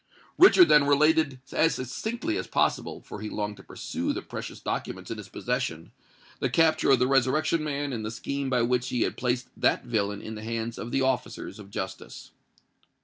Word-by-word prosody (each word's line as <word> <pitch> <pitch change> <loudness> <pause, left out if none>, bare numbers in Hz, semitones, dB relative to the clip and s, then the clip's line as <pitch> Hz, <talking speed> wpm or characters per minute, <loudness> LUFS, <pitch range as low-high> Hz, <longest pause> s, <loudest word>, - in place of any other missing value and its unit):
Richard 365 -1 +8
then 150 -1 +6
related 145 -1 +3
as 165 +1 +2
succinctly 130 - -3
as - - -3
possible,—for 105 - -1
he 105 - -4
longed 105 -1 -3
to 95 - -13
peruse - - -3
the - - -4
precious - - -6
documents - - -4
in - - -4
his - - -9
possession,—the - - -5
capture 160 -1 +3
of 135 - +7
the 125 - +2
Resurrection 140 +5 +2
Man 145 -2 -2
and 110 -2 -3
the 110 - -3
scheme 140 +4 -3
by 125 -2 +2
which 125 +1 0
he 120 - -1
had - - -2
placed 125 0 -1
that - - +2
villain 105 -4 -1
in 110 - -6
the 105 0 -7
hands 115 +1 -3
of 115 - -5
the 135 - +1
officers 130 -3 -2
of 100 -2 -11
justice. 95 -1 -7
125 Hz, 185 wpm, -27 LUFS, 115-145 Hz, -, Richard